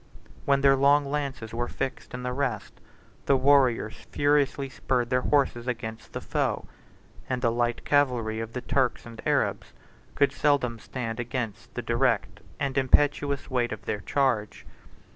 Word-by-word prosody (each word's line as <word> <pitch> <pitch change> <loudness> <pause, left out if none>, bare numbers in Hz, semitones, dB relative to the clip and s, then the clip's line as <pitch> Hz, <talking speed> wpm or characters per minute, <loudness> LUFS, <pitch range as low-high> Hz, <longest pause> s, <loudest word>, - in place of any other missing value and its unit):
When 140 -1 +3
their 135 0 +6
long 140 +2 +4
lances 140 -6 -3
were 120 +1 -2
fixed 135 0 -5
in 125 - -6
the 125 0 -2
rest, 125 -5 -2 0.5
the 140 - +5
warriors 130 -5 +2
furiously 145 -1 +2
spurred 125 -2 -1
their 125 0 +3
horses 130 -4 +1
against 115 -3 -5
the - - -4
foe; - - -1 0.6
and 125 -1 -2
the 115 - +3
light 120 0 -1
cavalry 125 -6 +2
of 115 +1 -5
the 125 - -4
Turks 130 -1 0
and 115 -1 -10
Arabs - - 0 0.4
could 140 -1 +3
seldom 135 -6 +1
stand 115 -1 -5
against 120 -2 -4
the - - -3
direct - - 0 0.2
and 135 -1 0
impetuous 140 +1 +2
weight 120 -2 +1
of 110 - -7
their 105 - -2
charge. 120 -7 0
125 Hz, 155 wpm, -27 LUFS, 120-140 Hz, 0.6 s, their